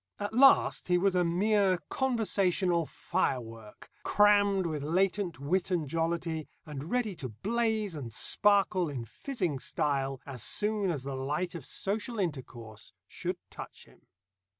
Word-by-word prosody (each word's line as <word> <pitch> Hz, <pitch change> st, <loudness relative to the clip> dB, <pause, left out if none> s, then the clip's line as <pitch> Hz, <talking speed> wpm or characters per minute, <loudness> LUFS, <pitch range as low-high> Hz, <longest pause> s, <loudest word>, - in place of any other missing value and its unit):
At 205 Hz, +1 st, -3 dB
last 270 Hz, +3 st, +5 dB
he 180 Hz, -1 st, +3 dB
was 195 Hz, +1 st, +2 dB
a 180 Hz, -1 st, +3 dB
mere 190 Hz, +2 st, +2 dB
conversational 195 Hz, -, +1 dB
firework, 115 Hz, -11 st, -3 dB
crammed 205 Hz, -2 st, +4 dB
with 155 Hz, -3 st, -2 dB
latent 180 Hz, +2 st, 0 dB
wit 175 Hz, +7 st, 0 dB
and 170 Hz, -5 st, 0 dB
jollity, 165 Hz, 0 st, -2 dB, 0.2 s
and 150 Hz, 0 st, -7 dB
ready 230 Hz, -5 st, 0 dB
to 130 Hz, -5 st, -5 dB
blaze 215 Hz, -, -1 dB
and 135 Hz, -7 st, -6 dB
sparkle 195 Hz, -, +2 dB
in 125 Hz, -5 st, -5 dB
fizzing 175 Hz, -, -3 dB
style 135 Hz, -1 st, -1 dB
as 130 Hz, -5 st, -6 dB
soon 210 Hz, -, +1 dB
as 145 Hz, -7 st, -2 dB
the 135 Hz, 0 st, -4 dB
light 150 Hz, +7 st, -2 dB
of 170 Hz, -5 st, -7 dB
social 220 Hz, +4 st, -2 dB
intercourse 130 Hz, -, -5 dB
should -, -, -4 dB
touch -, -, -10 dB
him. -, -, -23 dB
175 Hz, 140 wpm, -30 LUFS, 140-205 Hz, 0.2 s, last